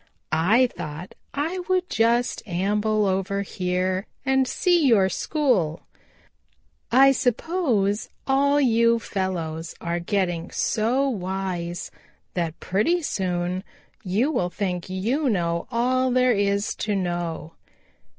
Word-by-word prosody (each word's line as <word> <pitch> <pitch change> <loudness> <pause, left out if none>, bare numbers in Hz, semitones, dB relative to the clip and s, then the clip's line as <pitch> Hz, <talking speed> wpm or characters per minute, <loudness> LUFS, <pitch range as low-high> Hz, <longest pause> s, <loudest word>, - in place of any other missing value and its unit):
"I 195 +11 +4
thought 160 -6 -7 0.2
I 320 +6 -2
would 370 -1 +1
just 235 -1 +1
amble 210 +4 +1
over 195 +1 0
here 185 +1 -1 0.2
and 265 -1 +2
see 350 +2 +2
your 200 -6 +4
school. 220 - 0 1.1
I 270 +3 +7
suppose 245 - 0 0.2
all 280 +2 +3
you 235 -3 +4
fellows 170 -6 -3
are 170 0 -2
getting 175 -2 -1
so 245 +6 +1
wise 185 -5 -3 0.4
that 170 -2 -2
pretty 325 - +1
soon 180 -4 -2 0.4
you 210 +11 +1
will 180 - 0
think 180 -2 -3
you 235 +10 0
know 170 -5 -1
all 255 +2 +1
there 255 0 +3
is 200 0 0
to 210 -1 -1
know. 175 -3 -3
200 Hz, 110 wpm, -24 LUFS, 180-255 Hz, 1.1 s, I